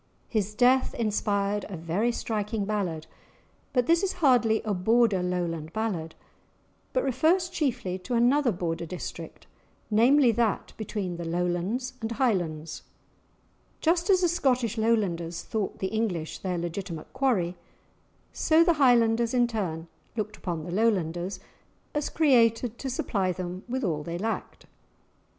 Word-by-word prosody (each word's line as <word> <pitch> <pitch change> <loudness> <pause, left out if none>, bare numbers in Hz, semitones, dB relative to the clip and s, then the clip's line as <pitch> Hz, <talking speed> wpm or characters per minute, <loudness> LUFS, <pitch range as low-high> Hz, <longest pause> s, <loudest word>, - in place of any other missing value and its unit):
His 210 -2 -1
death 255 +3 +3
inspired 205 -2 0
a 190 - -5
very 170 +9 0
striking 215 -2 -2
ballad, 185 -7 -2 0.7
but 250 -2 +2
this 335 +4 +4
is 390 -2 0
hardly 245 -9 +3
a 215 - -1
Border 210 +1 +3
Lowland 170 -3 -2
ballad, 185 -8 -3 0.8
but - - +1
refers 335 +7 +2
chiefly 230 - -2
to 240 +7 -3
another 245 +2 +3
Border 170 -2 -3
district, 180 +3 -7 0.5
namely, 245 +4 +5
that 225 -2 0
between 200 -5 -4
the 170 - -5
Lowlands 180 +9 -1
and 225 +1 -2
Highlands. 170 - -1 1.0
Just 340 +3 +1
as 375 -2 +5
the 355 - +4
Scottish 255 - +1
Lowlanders 195 -7 0
thought 215 -3 -3
the 190 - -2
English 195 -8 -2
their 180 -2 -2
legitimate 170 -1 -5
quarry, 230 -10 +1 0.8
so 320 +1 +4
the 340 0 +4
Highlanders 235 -2 +4
in 245 -1 +4
turn 180 -8 -3 0.3
looked 215 0 -3
upon 170 -6 -4
the 175 - -6
Lowlanders 185 -3 0 0.5
as 295 0 -1
created 240 -5 +3
to 270 - -3
supply 195 -7 -1
them 180 +1 -5
with 260 +2 -2
all 160 -7 0
they 170 +3 -4
lacked. 220 +4 -4
215 Hz, 135 wpm, -27 LUFS, 180-245 Hz, 1.0 s, namely